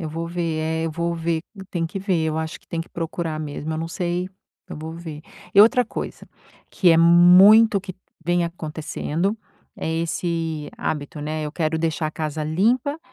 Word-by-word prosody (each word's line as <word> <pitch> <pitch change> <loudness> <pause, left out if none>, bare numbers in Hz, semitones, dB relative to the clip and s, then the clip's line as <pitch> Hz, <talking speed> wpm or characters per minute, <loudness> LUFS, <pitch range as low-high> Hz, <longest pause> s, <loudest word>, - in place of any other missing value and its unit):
Eu 160 - -4
vou 165 +2 -4
ver 170 -2 -2
é, 160 +1 -1
eu - - -2
vou 170 +1 -1
ver. 165 -1 -1 0.3
Tem 170 -3 -1
que 195 - -6
ver, 185 -4 0
eu 160 0 -1
acho 160 0 -4
que - - -31
tem 165 - -3
que 165 - -7
procurar 165 -1 -4
mesmo, 155 +1 -4
eu 155 - -3
não 165 - -3
sei 175 +1 -2 0.4
eu - - -6
vou 160 +1 -6
ver. 160 -3 -8 0.3
E 200 - +8
outra 245 +3 +5
coisa, 235 - -7 0.4
que 180 - +4
é 165 - +6
muito 180 +6 +7
o - - -9
que 185 -1 -8 0.3
vem 175 0 +2
acontecendo, 165 +3 -3 0.4
é - - -4
esse 165 -2 -2
hábito, 150 0 -4
né. 155 +1 -3
Eu 150 - -4
quero 160 0 -1
deixar 160 -1 -1
a - - -7
casa 155 -1 -3
limpa 240 - +1
165 Hz, 195 wpm, -23 LUFS, 155-175 Hz, 0.4 s, E